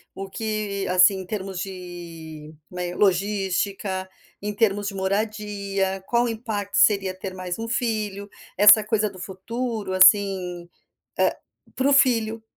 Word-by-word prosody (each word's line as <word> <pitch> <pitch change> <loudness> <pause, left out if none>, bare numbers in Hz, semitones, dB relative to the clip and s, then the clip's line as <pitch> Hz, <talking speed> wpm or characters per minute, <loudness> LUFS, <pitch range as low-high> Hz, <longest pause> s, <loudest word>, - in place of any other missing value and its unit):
o 195 0 -6
que, 210 -1 -3
assim, 185 +2 +5
em 190 - -7
termos 190 -1 -5
de, 170 -5 -8 0.2
né, 180 -1 -4
logística, 195 -1 0 0.3
em 210 +1 -3
termos 205 -2 +1
de 195 - -9
moradia, 200 -1 -2
qual 240 0 +2
impacto 215 -3 -4
seria 195 -3 +3
ter 190 0 -6
mais 185 0 -5
1 225 - -4
filho. 215 -4 -2 0.3
Essa 210 +1 +8
coisa 215 0 0
do 185 - -13
futuro 210 +3 -4
assim, 185 -2 +4 0.5
eh - - +3 0.4
para 265 +2 +1
o 285 - +4
filho, 230 -4 +2
200 Hz, 135 wpm, -24 LUFS, 185-215 Hz, 0.5 s, Essa